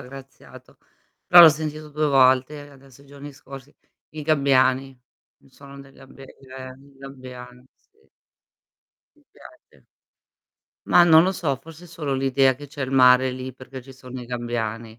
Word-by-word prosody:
aggraziato, 135 +1 -15 0.5
però 175 - +8
l'ho 165 - +10
sentito 155 0 -5
2 150 +1 -2
volte, 135 +2 +1
adesso 135 -1 -20
i 140 - -21
giorni 140 +1 -12
scorsi, 135 0 -14 0.4
i 155 0 -9
gabbiani. 135 -3 0 0.4
Il - - -26
suono 140 0 -15
dei 135 0 -17
gabbia 135 0 -16
eh, 130 -1 -13
i 140 0 -22
gabbiani, 125 -2 -13
sì. 430 +2 -36 1.1
Mi 300 - -29
piace. - - -20 1.0
Mah, 175 - +5
non 160 -1 +6
lo 190 +2 -1
so, 155 -7 -3
forse 165 +5 -15
solo 150 -5 -5
l'idea 135 0 +1
che 145 +3 -13
c'è 145 0 -8
il 130 - -5
mare 130 -1 +4
lì, 130 +1 -8
perché 130 0 -12
ci 135 +1 -15
sono 130 -1 -11
i 120 - -11
gabbiani. 115 -2 -6
135 Hz, 155 wpm, -22 LUFS, 130-145 Hz, 1.1 s, l'ho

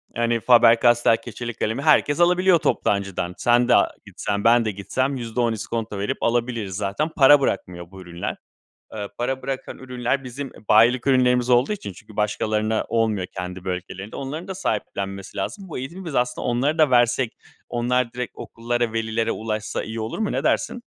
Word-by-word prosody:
yani, 115 0 +1
Faber 115 -1 +6
Castell 120 -1 +4
keçeli 120 -1 -7
kalemi 115 +5 -2
herkes 150 0 +3
alabiliyor 180 0 +4
toptancıdan. 95 -7 -1
Sen 120 0 +3
de 125 - +5
a - - +4 0.2
gitsen, 100 0 -3
ben 115 0 +5
de 110 - 0
gitsem 130 +8 -2
%10 115 -1 -1
iskonto 110 -1 -4
verip 100 - -3
alabiliriz 115 -4 -1
zaten, 105 - -1
para 145 -1 +6
bırakmıyor 90 -8 -3
bu 95 -1 -11
ürünler. 85 -1 -5 0.6
Eee, 105 -2 -4
para 130 +2 -2
bırakan 135 -1 -5
ürünler, 125 +1 -2
bizim 130 +2 -6 0.2
bayilik 120 +4 +5
ürünlerimiz 125 -1 +3
olduğu 125 +9 +4
için 195 - -7
çünkü 110 +3 -15
başkalarına 110 +1 0
olmuyor 110 -5 0
kendi 90 0 -6
bölgelerinde, 95 +2 -5
onların 150 +7 -5
da 190 - -5
sahiplenmesi 100 - -4
lazım. 190 - -4
Bu - - -5
eğitimi 170 +9 -7
biz 155 - -5
aslında 125 0 0
onları 135 +6 +1
da 155 -4 +4
versek 120 0 +2 0.3
onlar 120 0 0
direkt 125 -3 -4
okullara, 120 0 -3
velilere 115 0 -1
ulaşsa 110 -1 -3
iyi 110 +1 -6
olur 110 +1 -4
mu? 215 - 0
Ne - - -2
dersin? 240 - 0
120 Hz, 170 wpm, -23 LUFS, 105-130 Hz, 0.6 s, Faber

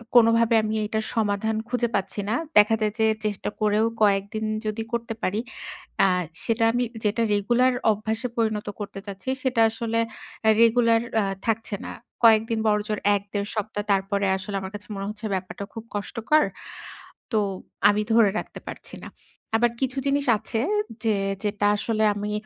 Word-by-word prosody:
কোনোভাবে 230 0 +5
আমি 215 0 -1
এইটার 220 +1 -2
সমাধান 220 0 0
খুঁজে 245 -2 0
পাচ্ছি 195 +1 -2
না। 225 - +1 0.2
দেখা 210 +2 +7
যায় 210 -1 +1
যে 220 - +4 0.2
চেষ্টা 205 -1 -2
করেও 215 +1 +3 0.2
কয়েকদিন 205 +2 +1 0.2
যদি 215 +1 -2
করতে 235 -1 -2
পারি, 205 +4 0 0.7
আ - - +6 0.4
সেটা 230 0 +1
আমি 245 +1 +1 0.2
যেটা 215 +3 +1
রেগুলার 240 +5 +3 0.2
অভ্যাসে 220 +4 -3
পরিণত 220 -2 0
করতে 195 -1 -6
চাচ্ছি, 200 +5 -5
সেটা 255 -3 +1
আসলে 230 0 -2 0.5
এ্যা 220 - +6
রেগুলার 230 0 +4 0.2
আ - - 0 0.2
থাকছে 225 -2 -1
না। - - -5 0.3
কয়েকদিন 225 0 +5
বড়জোর 210 0 0 0.2
১-১.৫ 200 +1 -4
সপ্তাহ, 210 -1 -3
তারপরে 200 +1 +1
আসলে 195 +1 -5
আমার 190 +1 -7
কাছে 205 +1 -8
মনে 195 0 -4
হচ্ছে 215 +1 -6
ব্যাপারটা 190 +2 -4
খুব 225 0 -7
কষ্টকর। 230 +8 +1 0.9
তো 220 - +3 0.5
আমি 210 +1 +1
ধরে 225 -3 +5
রাখতে - - -7
পারছি - - -9
না। - - -8 0.5
আবার 240 0 +3
কিছু 265 0 -1
জিনিস 280 +1 +1
আছে 225 +2 -3 0.4
যে 215 -2 +2 0.3
যেটা 205 0 0
আসলে 220 0 0
আমি 205 +1 -3
220 Hz, 160 wpm, -25 LUFS, 205-230 Hz, 0.9 s, দেখা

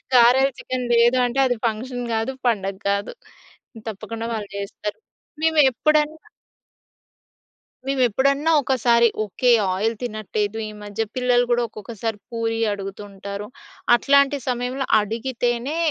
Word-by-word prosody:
గారెలు, 250 +3 +6
చికెన్ 255 -1 -3
లేదు 235 +2 +5
అంటే 245 +2 -1
అది 250 -1 +1
ఫంక్షన్ 245 +3 -2
గాదు, 225 +3 0 0.2
పండగ 195 -4 0
గాదు. 200 +1 -1 0.8
తప్పకుండా 220 +2 -6
వాళ్ళు 215 -2 -4
చేస్తారు. 200 +1 -5 0.4
మేము 320 -1 +3
ఎప్పుడన్నా. 305 +4 +1 1.6
మేము 270 -1 0
ఎప్పుడన్నా 275 +7 +2
ఒకసారి, 235 -3 +3 0.2
ఓకె 230 +5 +1 0.2
ఆయిల్ 220 +5 0
తినట్లేదు. 215 -2 -3
ఈ - - -8
మధ్య 205 +1 -4
పిల్లలు 250 -1 +3
గూడా 240 0 +2
ఒక్కొక్కసారి 225 0 -5
పూరి 225 -1 -2
అడుగుతూ 195 0 -7
ఉంటారు. 200 +1 -7 0.5
అట్లాంటి 280 +2 +3
సమయంలో 250 +2 -2
అడిగితేనే 240 +5 -2
235 Hz, 115 wpm, -22 LUFS, 215-255 Hz, 1.6 s, గారెలు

